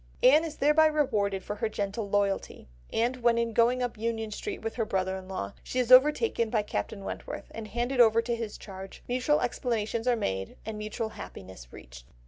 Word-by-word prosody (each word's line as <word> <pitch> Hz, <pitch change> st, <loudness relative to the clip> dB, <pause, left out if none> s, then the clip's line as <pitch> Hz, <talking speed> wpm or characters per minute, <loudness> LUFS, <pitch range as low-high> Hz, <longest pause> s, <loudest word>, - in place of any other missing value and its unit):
Anne 295 Hz, +5 st, +7 dB
is 315 Hz, -2 st, -5 dB
thereby 300 Hz, +2 st, +5 dB
rewarded 210 Hz, -11 st, 0 dB
for 210 Hz, -, -5 dB
her 220 Hz, -, -1 dB
gentle 205 Hz, 0 st, -3 dB
loyalty, 200 Hz, -1 st, -1 dB, 0.2 s
and 240 Hz, +3 st, +1 dB
when 235 Hz, -1 st, +3 dB
in 235 Hz, -1 st, 0 dB
going 245 Hz, +3 st, +3 dB
up 240 Hz, -3 st, -4 dB
Union 225 Hz, -1 st, -2 dB
Street 390 Hz, -, -5 dB
with 225 Hz, -, -3 dB
her 230 Hz, -, -1 dB
brother 190 Hz, -3 st, -1 dB
in 190 Hz, -1 st, -8 dB
law 100 Hz, -, -4 dB
she -, -, -5 dB
is 250 Hz, -1 st, +1 dB
overtaken 265 Hz, -, +5 dB
by 215 Hz, -2 st, +1 dB
Captain 200 Hz, -, -4 dB
Wentworth, -, -, -6 dB
and 225 Hz, -1 st, -7 dB
handed 240 Hz, +4 st, -2 dB
over 225 Hz, -1 st, +6 dB
to 235 Hz, +1 st, -1 dB
his 230 Hz, -2 st, -5 dB
charge, 190 Hz, -1 st, -10 dB
mutual 255 Hz, +5 st, +1 dB
explanations 230 Hz, -1 st, -1 dB
are 245 Hz, -, +4 dB
made 95 Hz, -, -3 dB
and 215 Hz, 0 st, -5 dB
mutual 215 Hz, +1 st, -3 dB
happiness 95 Hz, -, -10 dB
reached. -, -, -12 dB
225 Hz, 195 wpm, -28 LUFS, 200-245 Hz, 0.2 s, Anne